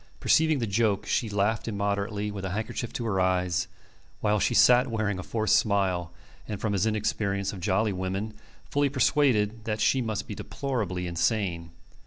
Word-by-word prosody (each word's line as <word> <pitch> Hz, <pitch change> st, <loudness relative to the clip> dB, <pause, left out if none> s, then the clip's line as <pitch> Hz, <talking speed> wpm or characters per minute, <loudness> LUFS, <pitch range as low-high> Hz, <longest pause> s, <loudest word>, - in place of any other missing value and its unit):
Perceiving 160 Hz, -1 st, +3 dB
the 120 Hz, -, -1 dB
joke, 105 Hz, -1 st, +1 dB
she 115 Hz, -5 st, 0 dB
laughed 105 Hz, +3 st, 0 dB
immoderately 100 Hz, 0 st, -2 dB
with 100 Hz, -2 st, -6 dB
a 95 Hz, -, -2 dB
handkerchief 110 Hz, +4 st, -4 dB
to 120 Hz, -, -3 dB
her 100 Hz, -4 st, 0 dB
eyes, 90 Hz, -1 st, +1 dB, 0.5 s
while 105 Hz, 0 st, +1 dB
he 105 Hz, -, +1 dB
sat 125 Hz, +1 st, +6 dB
wearing 110 Hz, -4 st, -1 dB
a -, -, -3 dB
forced 110 Hz, +2 st, +1 dB
smile, 95 Hz, -4 st, 0 dB, 0.4 s
and, 105 Hz, -2 st, -4 dB
from 110 Hz, -2 st, -1 dB
his 100 Hz, +2 st, +1 dB
inexperience 100 Hz, -2 st, -1 dB
of 95 Hz, -, -7 dB
jolly 100 Hz, +3 st, +1 dB
women, 95 Hz, +3 st, -3 dB, 0.3 s
fully 145 Hz, 0 st, +1 dB
persuaded 120 Hz, -5 st, +2 dB
that 110 Hz, -1 st, -2 dB
she 130 Hz, -, +3 dB
must 110 Hz, -4 st, -3 dB
be -, -, -5 dB
deplorably 110 Hz, -10 st, -3 dB
insane. 85 Hz, -1 st, -1 dB
105 Hz, 170 wpm, -27 LUFS, 95-110 Hz, 0.5 s, sat